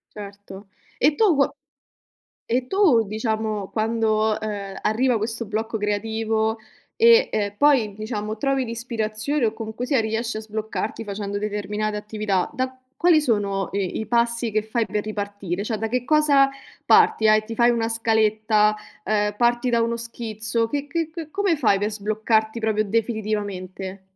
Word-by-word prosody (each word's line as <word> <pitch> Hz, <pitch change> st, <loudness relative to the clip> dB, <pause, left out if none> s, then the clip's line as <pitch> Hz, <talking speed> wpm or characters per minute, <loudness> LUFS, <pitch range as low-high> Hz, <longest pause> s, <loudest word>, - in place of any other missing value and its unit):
Certo. 200 Hz, -1 st, -10 dB, 0.3 s
E 290 Hz, +3 st, +3 dB
tu 410 Hz, -8 st, +4 dB
qua 280 Hz, 0 st, +2 dB, 0.9 s
e 250 Hz, +2 st, 0 dB
tu 350 Hz, -, +4 dB
diciamo, 215 Hz, -1 st, -2 dB
quando, 220 Hz, -1 st, +1 dB
ehm, 200 Hz, -2 st, -5 dB
arriva 245 Hz, +2 st, +2 dB
questo 225 Hz, +2 st, 0 dB
blocco 220 Hz, +2 st, -3 dB
creativo 220 Hz, +1 st, -1 dB, 0.4 s
e 465 Hz, +1 st, +6 dB
e 205 Hz, -1 st, -1 dB
poi 265 Hz, -8 st, +3 dB
diciamo, 215 Hz, 0 st, -4 dB
trovi 270 Hz, +1 st, 0 dB
l'ispirazione 230 Hz, +3 st, -2 dB
o 215 Hz, -, 0 dB
comunque 225 Hz, +2 st, -5 dB
sia 270 Hz, -2 st, +2 dB
riesci 225 Hz, +1 st, -2 dB
a -, -, -3 dB
sbloccarti 220 Hz, +1 st, -4 dB
facendo 205 Hz, -1 st, -4 dB
determinate 210 Hz, 0 st, -2 dB
attività, 210 Hz, -3 st, -1 dB
da 260 Hz, +1 st, -3 dB, 0.2 s
quali 335 Hz, -3 st, +4 dB
sono 200 Hz, -7 st, 0 dB
i 195 Hz, -2 st, -2 dB
i 220 Hz, -, -4 dB
passi 235 Hz, -1 st, +1 dB
che 215 Hz, 0 st, +1 dB
fai 220 Hz, +1 st, -1 dB
per 210 Hz, -1 st, -2 dB
ripartire? 205 Hz, -3 st, -4 dB
Cioè, 220 Hz, -1 st, -2 dB
da 225 Hz, +1 st, -2 dB
che 250 Hz, +1 st, -1 dB
cosa 285 Hz, -2 st, +4 dB, 0.4 s
parti? 220 Hz, -, +5 dB
Hai 215 Hz, 0 st, +5 dB
ti 225 Hz, 0 st, -7 dB
fai 240 Hz, 0 st, +5 dB
una 230 Hz, -1 st, 0 dB
scaletta, 215 Hz, -1 st, +2 dB, 0.3 s
uhm, 210 Hz, -1 st, 0 dB
parti 240 Hz, +1 st, +2 dB
da 230 Hz, -1 st, +2 dB
uno 235 Hz, 0 st, 0 dB
schizzo, 230 Hz, -1 st, -2 dB
che 285 Hz, +2 st, -3 dB
che 330 Hz, +1 st, -2 dB
che 325 Hz, -2 st, -7 dB
come 390 Hz, -5 st, +1 dB
fai 215 Hz, -7 st, +3 dB
per 210 Hz, +1 st, 0 dB
sbloccarti 220 Hz, +2 st, 0 dB
proprio 215 Hz, -1 st, +1 dB
definitivamente? 205 Hz, -3 st, -3 dB
220 Hz, 155 wpm, -23 LUFS, 210-235 Hz, 0.9 s, e